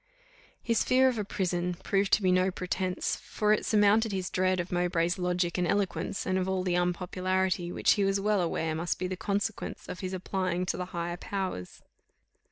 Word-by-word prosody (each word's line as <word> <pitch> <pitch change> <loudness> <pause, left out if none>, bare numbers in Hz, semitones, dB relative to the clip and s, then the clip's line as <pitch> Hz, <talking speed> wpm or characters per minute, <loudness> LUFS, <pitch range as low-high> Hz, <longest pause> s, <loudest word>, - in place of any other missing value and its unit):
His 230 -1 +2
fear 260 +1 +4
of 240 -4 -2
a - - 0
prison 180 -3 -1
proved 195 +2 0
to 210 - +4
be 185 - +4
no 185 +1 +3
pretence, 185 0 -2
for 210 0 0
it 215 - -1
surmounted 215 +1 +4
his 185 -2 -3
dread 185 0 +1
of 175 0 -3
Mowbray's 175 0 +1
logic 180 0 0
and 175 - +1
eloquence, 200 0 -1
and 185 0 +1
of 185 0 -1
all 190 -1 0
the 180 -1 0
unpopularity 180 0 0
which - - +2
he 205 - +3
was 195 0 +2
well 205 -1 +2
aware 165 -2 -1
must 165 +2 -1
be 185 - -3
the 185 - -3
consequence 205 +2 -3
of - - -6
his 185 -1 -4
applying 185 -1 -1
to 180 - -1
the 180 - -3
higher 175 -1 -4
powers. 190 - -5
185 Hz, 195 wpm, -29 LUFS, 180-195 Hz, -, fear